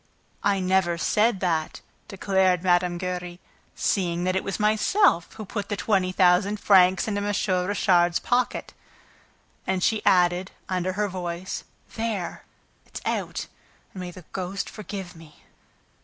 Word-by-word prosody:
"I 200 -1 +2
never 185 -2 +1
said 210 +4 +2
that," 165 -4 -1 0.3
declared 190 -2 +1
Mme. 175 -1 +2
Giry, 180 -1 -4 0.4
"seeing 175 -3 0
that 185 +1 0
it 190 - 0
was 195 - -4
myself 215 - +3
who 215 - -8
put 200 0 -5
the 205 - -2
twenty 185 -1 +1
thousand 185 +3 +3
francs 190 -2 +5
into 205 -1 -1
M. 205 - -2 0.4
Richard's 175 -4 +3
pocket." 245 0 -1 0.9
And 185 -1 0
she 220 -2 +1
added, 180 +1 +3 0.2
under 185 0 -1
her 205 +2 0
voice, 180 -1 -5 0.3
"There! 220 -5 -3 0.4
It's - - -8
out!... - - -2 0.5
And 190 - -8
may 180 - -5
the 175 -1 -12
ghost 190 +1 -4
forgive 195 -4 -7
me!" 160 -2 -16
185 Hz, 140 wpm, -25 LUFS, 180-200 Hz, 0.9 s, francs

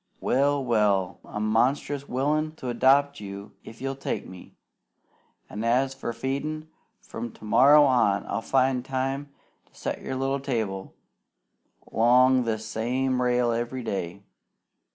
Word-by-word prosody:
Well! 140 +1 +1
Well! 100 -6 +1
I'm 105 +1 -4
monstrous 135 +5 0
willin' 150 +4 0
to 130 -5 -6
adopt 140 +4 +3
you 100 0 -8
if 115 - -12
you'll 135 +1 -3
take 135 - -4
me; 90 -1 -13 0.9
an', 105 +3 -6
as 130 +3 +2
for 135 -3 -5
feedin', 140 +6 -4 0.3
from 115 0 -6
to - - -13
morrow 140 +7 +6
on 120 -7 +2
I'll 100 - -3
find 130 0 +1
time 135 +2 -3 0.4
to - - -30
set - - -4
your 130 - -4
little 135 +1 -1
table 110 -8 -3 1.0
'long 125 +2 +4
this 110 -1 -2
same 125 +4 -1
rail 125 -1 +2
every 120 +2 -3
day. 95 -2 -4
125 Hz, 135 wpm, -26 LUFS, 110-135 Hz, 1.0 s, morrow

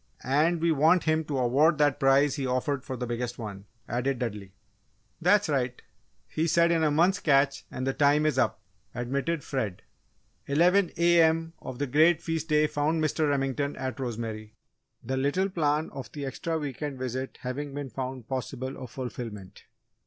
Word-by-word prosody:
"And 155 +5 +2
we 170 0 +3
want 160 +4 +4
him 155 0 +1
to 145 -2 -3
award 140 +6 +3
that 145 -1 +2
prize 135 0 +4
he 135 -3 -2
offered 130 +2 -1
for 130 -2 -5
the 125 - -3
biggest 120 0 -3
one," 100 -4 -7 0.2
added 125 +3 -1
Dudley. 105 -5 -5 0.7
"That's 195 +4 +4
right. 130 -4 -1 0.5
He 160 +2 -1
said 170 +1 +4
'in 165 -1 +2
a 155 - +4
month's 175 +6 +3
catch,' 140 -2 +2
and 130 - -4
the 135 - 0
time 145 +2 +3
is 150 -4 +1
up," 110 -2 +1 0.3
admitted 140 +6 -2
Fred. 110 -9 -3 0.6
Eleven 175 +6 +4
A.M. 165 -1 +3
of 130 - -7
the 145 - -1
great 160 +5 +4
feast 165 -1 -3
day 150 0 +4
found 155 +2 0
Mr. 155 0 +1
Remington 140 0 -1
at 130 -2 -4
Rosemary, 110 -3 -5 0.5
the 130 0 -2
little 145 +9 +1
plan 155 -2 0
of 130 -5 -8
the 145 -2 -5
extra 160 +4 -3
week 145 -4 -5
end 145 -3 -3
visit 130 +1 -4
having 140 +3 -4
been 140 -3 -5
found 130 -3 -5
possible 130 0 -4
of 125 - -8
fulfilment. 110 -5 -7
140 Hz, 175 wpm, -28 LUFS, 125-155 Hz, 0.7 s, want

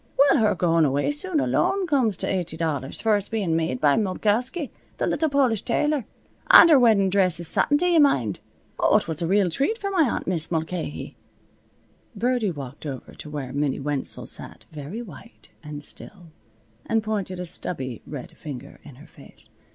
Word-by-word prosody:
Well, 280 +2 +5
her 215 -2 +3
going 165 -2 +2
away 145 - +1
suit 315 +2 0
alone 385 +6 +1
comes 255 - +1
to - - -2
eighty 175 -4 -2
dollars, 145 -5 -3
for 220 -2 +3
it's 200 0 -6
bein' 200 -8 -1
made 160 -6 -1
by 145 0 +3
Molkowsky, 220 - -1 0.3
the - - 0
little 315 - 0
Polish 265 -7 +2
tailor. 295 -6 0 0.4
An' 335 - +10
her 300 -4 +7
weddin' 210 -6 +4
dress 185 -4 +2
is 170 - -2
satin, 290 - +3
do 355 - 0
yuh 345 -2 +4
mind! 125 - +2 0.4
Oh, - - +4
it - - -2
was 160 +1 -3
a 165 - 0
real 195 -1 +2
treat 280 - 0
for 395 -3 -4
my 370 -4 +2
aunt - - -3
Mis' 170 -3 -1
Mulcahy." 160 -1 -4 1.0
Birdie 240 0 0
walked 145 -2 -7
over 135 -3 -7
to 150 - -10
where 140 -4 -5
Minnie 140 -1 -1
Wenzel 145 -1 -3
sat, - - -5
very 155 +10 -7
white 230 +3 -14
and 150 -2 -8
still, 175 -6 -11 0.6
and 225 -1 +1
pointed 200 -4 -3
a 180 - -4
stubby 130 -8 -3
red 155 +4 -8
finger 145 -7 -9
in 140 - -13
her 135 - -15
face. - - -17
185 Hz, 185 wpm, -24 LUFS, 150-240 Hz, 1.0 s, An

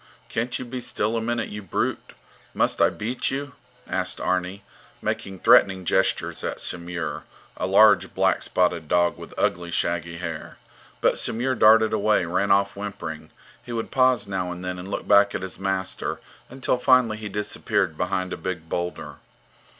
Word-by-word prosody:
Can't 120 +2 -1
you 130 - -6
be 125 +1 -5
still 110 -1 0
a 115 - 0
minute, 120 +1 -2
you 105 0 -6
brute? 95 - -3 0.4
Must - - +1
I - - +6
beat 120 +4 -2
you? 140 +1 -4 0.3
asked - - -1
Arni, 95 +2 -1 0.4
making 95 -1 -3
threatening 95 -2 +5
gestures - - +1
at - - -3
Samur, 85 -1 -4 0.3
a 90 - -2
large, 100 +2 +5
black - - +2
spotted 85 -3 0
dog 85 +2 +2
with - - -11
ugly, 85 0 0
shaggy 85 0 -1
hair. 85 -2 -6 0.4
But - - +3
Samur 125 +4 0
darted 110 -2 +5
away, 105 -3 +2
ran 95 +4 0
off 100 0 +3
whimpering; 100 -6 -6 0.3
he 120 - -10
would 115 -1 -3
pause 130 -1 +3
now 95 -2 -3
and 90 +1 -7
then 90 0 -4
and 90 +2 -8
look - - -4
back 100 0 +5
at - - -3
his 95 -3 -6
master, 95 -1 -2 0.3
until 130 -1 -1
finally 125 -4 +4
he 105 -1 -6
disappeared 100 -5 -1
behind 95 +2 -2
a - - -4
big 85 -1 -5
boulder. 90 +1 -4
100 Hz, 165 wpm, -24 LUFS, 90-110 Hz, 0.4 s, I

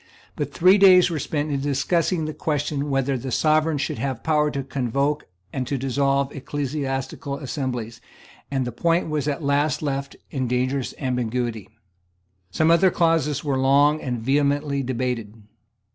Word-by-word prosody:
But 145 -1 -3
three 185 +6 +5
days 185 -2 +7
were 160 - -2
spent 150 0 -2
in 140 -1 -1
discussing 155 +4 0
the 155 - -4
question 145 -1 -2
whether 135 -1 0
the 130 +2 -5
Sovereign 155 +3 +2
should 140 - -3
have 135 -4 -3
power 150 -2 +2
to 140 -2 -3
convoke 140 +3 -1 0.3
and 130 -2 -3
to 140 - -1
dissolve 135 +1 0
ecclesiastical 140 -1 -3
assemblies; 125 -5 -4 0.5
and 135 -2 -1
the 125 - -3
point 165 +7 +1
was 150 -2 -1
at 150 +2 -2
last 145 +1 +1
left 140 -1 -3 0.2
in 130 -3 -2
dangerous 130 +2 -1
ambiguity. 120 - -2 0.8
Some 160 +8 +2
other 170 +3 +5
clauses 165 -5 +1
were 140 -3 0
long 145 +3 +4
and 125 -2 -2
vehemently 140 +3 +1
debated. 125 -4 -3
140 Hz, 150 wpm, -23 LUFS, 130-150 Hz, 0.8 s, days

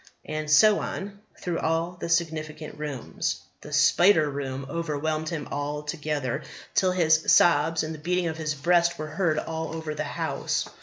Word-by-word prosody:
And 155 0 -4
so 205 +8 +6
on, 200 +1 -5 0.2
through 175 -2 -2
all 165 +2 0
the - - -3
significant 155 -2 -2
rooms. 145 -5 -3 0.2
The - - -10
spider 165 -5 +5
room 135 -1 -4
overwhelmed 155 0 -2
him 155 -4 -4
altogether, 150 -2 -3 0.3
till 185 -1 +3
his 160 -3 +3
sobs 165 0 +4
and 155 +1 -4
the 155 - -9
beating 180 +3 0
of 160 -1 -2
his 155 -1 -2
breast 170 +3 +2
were 155 - -4
heard 155 0 0
all 160 +1 -3
over 160 -1 -4
the 150 0 -3
house. - - -2
155 Hz, 160 wpm, -26 LUFS, 150-170 Hz, 0.3 s, so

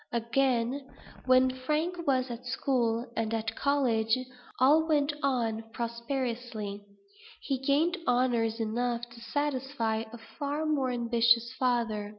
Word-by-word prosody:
Again, 245 +2 0 0.4
when 255 0 +5
Frank 305 +7 -2
was 255 -2 +2
at 240 +1 -7
school 245 -3 0
and 225 -1 -1
at 225 0 -3
college, 250 -5 +2 0.4
all 300 +5 +5
went 295 -2 +2
on 235 -5 0
prosperously; 235 -3 -3 0.6
he 270 -2 -1
gained 300 +7 +2
honors 240 -2 +2
enough 235 +2 -1
to 235 0 -13
satisfy 260 -4 -1
a 235 - -8 0.2
far 290 +2 -1
more 285 -4 +1
ambitious 235 -1 +2
father. 230 -5 0
245 Hz, 120 wpm, -29 LUFS, 230-275 Hz, 0.6 s, when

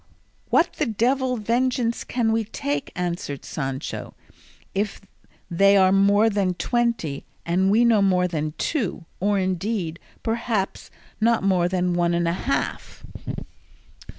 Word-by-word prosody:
"What - - +3
the - - +1
devil 250 +3 +1
vengeance 235 +2 0
can 235 -3 0
we 225 0 +1
take," 145 -9 -3
answered 175 -5 -3
Sancho, 135 -1 -4 0.6
"if 205 +1 -2 0.5
they 195 +3 +5
are 190 -1 +5
more 200 +3 +4
than 200 -4 +1
twenty, 235 - -1 0.2
and 185 +3 +2
we 225 +4 +4
no 225 -3 +4
more 180 -2 +3
than 155 -3 -3
two, 215 - -2
or, 205 +2 +2
indeed, 185 -2 -1 0.2
perhaps 225 -3 -2 0.3
not 230 -1 +3
more 185 -3 +3
than 180 -1 0
one 175 0 +1
and 170 0 +1
a 170 - +1
half?" 260 +9 -3
195 Hz, 130 wpm, -24 LUFS, 175-230 Hz, 0.6 s, they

